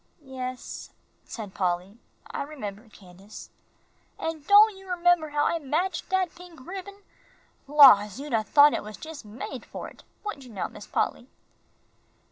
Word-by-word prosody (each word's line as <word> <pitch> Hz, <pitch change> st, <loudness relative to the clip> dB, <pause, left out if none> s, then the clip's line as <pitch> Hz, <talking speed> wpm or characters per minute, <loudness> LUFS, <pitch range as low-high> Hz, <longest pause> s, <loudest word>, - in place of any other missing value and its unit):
"Yes," 255 Hz, -1 st, -6 dB, 0.4 s
said 210 Hz, -5 st, -8 dB
Polly, 185 Hz, +3 st, -2 dB, 0.3 s
"I -, -, -5 dB
remember, 220 Hz, -7 st, -7 dB
Candace." 195 Hz, 0 st, -13 dB, 0.7 s
"An' 325 Hz, -1 st, -4 dB
don' 415 Hz, +6 st, +6 dB
you 385 Hz, -1 st, -5 dB
'member 350 Hz, -3 st, +3 dB
how 295 Hz, 0 st, +1 dB
I 335 Hz, -, +1 dB
matched 330 Hz, +5 st, -2 dB
dat 375 Hz, -2 st, 0 dB
pink 350 Hz, -3 st, -14 dB
ribbin? 395 Hz, +2 st, -8 dB, 0.6 s
Laws, 255 Hz, -7 st, +7 dB
you'd 290 Hz, -2 st, -6 dB
'a' 225 Hz, -, +3 dB
thought 290 Hz, +7 st, +6 dB
it -, -, -1 dB
was 210 Hz, 0 st, -9 dB
jus' 315 Hz, -3 st, -9 dB
made 235 Hz, +3 st, -7 dB
for -, -, -8 dB
it, -, -, -18 dB, 0.2 s
wouldn't 305 Hz, -11 st, -6 dB
you -, -, -13 dB
now, 195 Hz, -, -3 dB
Miss -, -, -12 dB
Polly?" -, -, -2 dB
285 Hz, 150 wpm, -26 LUFS, 215-350 Hz, 0.7 s, Laws